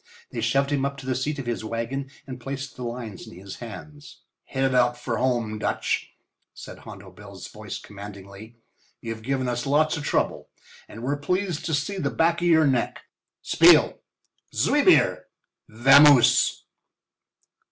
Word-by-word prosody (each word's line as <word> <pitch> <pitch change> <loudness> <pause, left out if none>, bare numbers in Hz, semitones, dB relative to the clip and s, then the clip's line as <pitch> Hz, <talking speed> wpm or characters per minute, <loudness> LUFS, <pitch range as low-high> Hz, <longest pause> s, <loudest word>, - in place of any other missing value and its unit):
They 115 - -4
shoved 135 +5 +1
him 140 -2 0
up 140 0 -2
to 135 - -10
the 130 - -1
seat 135 +4 -2
of 135 - -5
his 120 -2 -3
wagon 115 +5 -4 0.2
and 130 -2 -8
placed 135 +2 -6
the 125 - -11
lines 115 -5 -6
in - - -12
his 95 +1 -10
hands. 145 +6 -11 0.2
"Hit 135 0 -3
it 135 0 +1
out 125 -1 +2
for 120 -2 -3
home, 120 -4 -1
Dutch," - - -2 0.4
said - - -11
Hondo - - -12
Bill's - - -11
voice - - -8
commandingly. 100 +2 -11 0.4
"You've 115 -1 -6
given 130 +2 -2
us 120 +1 -3
lots 155 +3 +2
of 145 - -6
trouble - - -1 0.4
and 115 - -10
we're 140 +3 -1
pleased 180 +2 -2
to 160 - 0
see 190 +7 -3
the - - -1
back 170 +1 +1
of 175 - +1
your 160 -2 +5
neck. 130 -4 -1 0.4
Spiel! - - +5 0.6
Zwei - - +2
bier! - - +4 0.4
Vamoose!" 135 +3 +5
130 Hz, 165 wpm, -24 LUFS, 115-145 Hz, 0.6 s, your